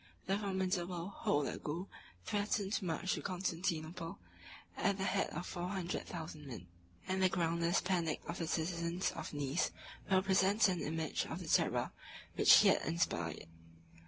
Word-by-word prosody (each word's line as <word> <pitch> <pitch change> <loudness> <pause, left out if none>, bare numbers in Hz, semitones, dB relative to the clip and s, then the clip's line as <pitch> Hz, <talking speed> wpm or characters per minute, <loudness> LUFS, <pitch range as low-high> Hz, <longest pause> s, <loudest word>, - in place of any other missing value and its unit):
The 195 +2 +1
formidable 185 -2 -1
Holagou 150 +4 0 0.4
threatened 205 - 0
to 195 - 0
march 180 +2 0
to - - -3
Constantinople 170 -1 -2 0.6
at 200 -1 +1
the 190 - -2
head 195 0 +1
of 175 +3 -5
four 175 0 -4
hundred 185 -2 -3
thousand 160 -3 -7
men; 115 -9 -7 0.4
and 190 0 0
the 185 - +5
groundless 170 -1 +1
panic 175 -4 0
of - - -4
the 165 - -2
citizens 170 +2 -1
of 160 - -6
Nice 145 +2 0 0.4
will 190 -1 +4
present 195 +2 +4
an 180 -2 -1
image 160 0 -1
of - - -4
the - - -7
terror - - +2 0.4
which - - +5
he - - +8
had - - +4
inspired. 85 - -1
175 Hz, 155 wpm, -36 LUFS, 165-190 Hz, 0.6 s, he